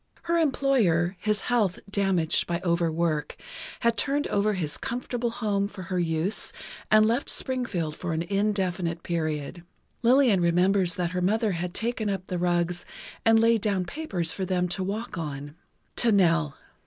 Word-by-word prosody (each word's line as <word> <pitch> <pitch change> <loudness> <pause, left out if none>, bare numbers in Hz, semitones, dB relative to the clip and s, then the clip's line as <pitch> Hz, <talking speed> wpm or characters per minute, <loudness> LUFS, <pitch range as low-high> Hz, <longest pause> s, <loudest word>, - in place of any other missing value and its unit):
Her 340 0 +1
employer, 240 - +2
his 210 -1 0
health 220 -7 +1
damaged 195 -5 +1
by 170 0 -1
over 170 -2 +1
work, 160 -2 -1 0.5
had 235 -1 +2
turned 285 +1 0
over 210 +1 +1
his 160 -6 -3
comfortable 245 0 -2
home 205 -4 -1
for 190 -2 -9
her 180 0 -2
use 165 +4 0 0.4
and 215 0 +6
left 235 +5 0
Springfield 200 - -2
for 175 - -4
an 160 +1 -1
indefinite 185 -3 -1
period. 160 0 -3 0.4
Lillian 245 -5 +4
remembers 180 +1 +3
that 175 -2 -1
her 180 0 -2
mother 215 +3 +2
had 180 0 -4
taken 225 -2 -2
up 195 -2 -3
the 180 -2 -3
rugs 175 0 0 0.4
and 225 0 +6
laid 230 -1 +4
down 195 -4 0
papers 180 - -3
for 190 - -4
them 180 -1 0
to 185 +2 -2
walk 205 0 -4
on. 145 -2 -5 0.4
To 235 - +4
Nell 165 -7 +3
190 Hz, 160 wpm, -26 LUFS, 170-220 Hz, 0.5 s, and